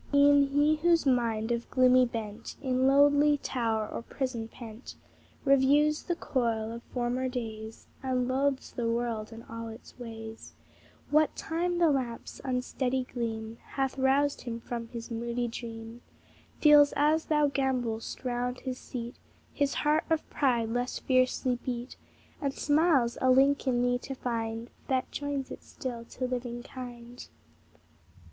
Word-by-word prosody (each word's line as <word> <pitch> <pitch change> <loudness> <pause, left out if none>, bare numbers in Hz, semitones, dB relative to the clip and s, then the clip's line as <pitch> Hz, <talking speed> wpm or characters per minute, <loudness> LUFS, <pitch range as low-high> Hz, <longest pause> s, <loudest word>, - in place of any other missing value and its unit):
E'en 285 0 +6
he 290 +2 +3
whose 335 0 +3
mind, 235 -3 +1
of 235 0 -2
gloomy 255 -1 +5
bent, 225 -1 -6
In 260 -1 +1
lonely 285 +1 +5
tower 225 -5 -1
or - - -5
prison 235 -2 -3
pent, 225 +1 -10 0.5
Reviews 285 +3 +4
the 350 - -2
coil 230 -8 -1
of 235 +1 -6
former 250 +1 -1
days, 220 -3 -6 0.2
And 255 -2 0
loathes 270 +1 0
the 235 -2 -2
world 230 -2 -2
and 225 0 -10
all 230 0 -6
its 225 +3 -12
ways, 225 -2 -8 0.6
What 305 +1 +4
time 345 +2 -1
the 340 -3 +4
lamp's 250 -4 -3
unsteady 255 0 -1
gleam 225 -2 -4
Hath 270 -1 -2
roused 275 +2 +2
him 235 -2 -5
from 235 0 -5
his 230 0 -8
moody 235 +1 -2
dream, 230 0 -7 0.6
Feels, 295 -1 +7
as 305 +2 +3
thou 300 -1 +3
gambol'st 255 -4 -2
round 245 0 -2
his 260 -1 -4
seat, 240 -1 -6 0.4
His 285 -2 0
heart 300 +1 +2
of 320 -1 0
pride 240 -6 +1
less 245 +2 -1
fiercely 255 -1 +1
beat, 245 0 -4 0.5
And 275 -2 -1
smiles, 290 -5 +3
a 260 - +3
link 275 +2 +4
in 245 -1 +2
thee 245 0 +2
to 270 +1 -6
find 230 -1 -3 0.2
That 260 -2 0
joins 285 -2 -3
it - - -7
still 245 -5 -6
to 255 - -4
living 245 -1 -4
kind. 245 -1 -9
250 Hz, 145 wpm, -29 LUFS, 235-275 Hz, 0.6 s, Feels